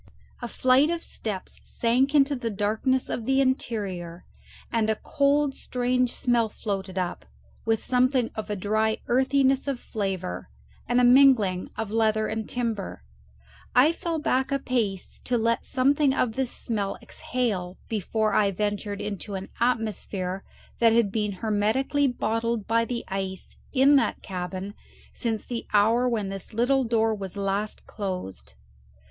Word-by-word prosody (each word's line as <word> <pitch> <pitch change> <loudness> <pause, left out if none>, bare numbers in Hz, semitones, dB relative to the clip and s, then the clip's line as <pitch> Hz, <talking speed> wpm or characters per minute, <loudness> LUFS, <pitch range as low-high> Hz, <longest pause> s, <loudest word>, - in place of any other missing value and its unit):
A 240 - -3
flight 255 +5 +3
of 340 0 -2
steps 200 -4 -6
sank 255 +5 +1
into 280 0 +4
the 245 -3 -3
darkness 220 +6 0
of 225 - -4
the 270 0 +3
interior, 200 -10 -2 0.5
and 225 -2 +1
a 220 - +2
cold 280 +4 +1
strange 250 -1 0
smell 240 -3 +1
floated 195 -3 -4
up, 180 -1 -2 0.4
with 225 -1 +1
something 255 -1 +2
of 215 -1 -5
a 210 - -1
dry 215 +3 +1
earthiness 265 +2 +2
of 275 -3 -1
flavour 190 - -4 0.4
and 245 +1 +3
a - - +4
mingling 245 -8 +5
of 220 -2 -3
leather 220 -1 +2
and 220 0 -3
timber. 225 - -3 0.7
I 270 +6 +6
fell 335 0 -3
back 265 -3 0
a 275 - +2
pace 225 -8 -2
to 245 - +1
let 230 0 0
something 275 +1 +3
of 235 -5 +1
this 265 0 -1
smell 205 -5 -3
exhale 200 -8 -3
before 215 0 0
I 205 -1 +4
ventured 205 +1 -2
into 205 0 -5
an 190 0 -6
atmosphere 210 -5 -1 0.4
that 230 -1 +5
had 230 -4 +3
been 210 -1 -1
hermetically 220 +8 +1
bottled 230 -3 -1
by 230 +1 +2
the 235 0 -4
ice 190 -1 -5 0.2
in 280 +1 +5
that 235 -5 0
cabin 185 +1 -5 0.4
since 225 -3 -2
the 240 -2 -5
hour 225 +4 +4
when 215 -5 -1
this 195 +2 -7
little 265 +4 +3
door 225 -1 +2
was 195 -2 -6
last 200 +2 -2
closed. 185 - -6
225 Hz, 150 wpm, -26 LUFS, 200-255 Hz, 0.7 s, I